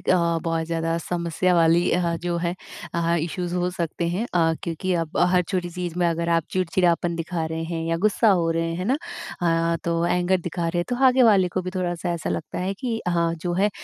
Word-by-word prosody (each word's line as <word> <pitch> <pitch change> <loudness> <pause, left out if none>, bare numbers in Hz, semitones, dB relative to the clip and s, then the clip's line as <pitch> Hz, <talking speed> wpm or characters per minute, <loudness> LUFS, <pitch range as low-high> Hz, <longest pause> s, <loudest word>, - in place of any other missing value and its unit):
एक 170 -2 +2
बहुत 165 -1 0
ज़्यादा 165 0 -1
समस्या 175 +1 0
वाली 170 +1 +4
अ, 170 -1 +1
जो 175 -1 0
है 170 +1 0 0.4
अ, 170 0 +1
इशूज़ 175 +2 -3
हो 180 0 0
सकते 170 -1 -2
हैं। 190 +8 -1
अ, 165 -1 +3
क्योंकि 175 +3 -2
अब 160 - -7 0.2
हर 180 - +4
छोटी 175 0 -3
चीज़ 175 0 -5
में 175 - +3
अगर 170 0 -1
आप 165 -1 +3
चिड़चिड़ापन 175 -1 +1
दिखा 165 0 -3
रहे 160 0 -3
हैं 165 0 -3
या 165 - +1
गुस्सा 215 +1 +3
हो 165 - +1
रहे 165 0 -1
हैं 180 +2 -3
ना? 260 +6 +2 0.8
अ, - - +1
तो 170 - 0
एंगर 180 +2 +2
दिखा 170 0 -2
रहे 175 +1 -1
हैं। 175 - +1
तो 245 - -1
आगे 255 0 +5
वाले 200 -6 +5
को 185 - +1
भी 185 - -4
थोड़ा-सा 175 -1 -2
ऐसा 170 - -3
लगता 160 - -4
है 190 +2 -2
कि 230 +1 -3
हाँ 170 -1 +1
जो 175 - 0
है 200 +4 +2
175 Hz, 220 wpm, -24 LUFS, 165-180 Hz, 0.8 s, आगे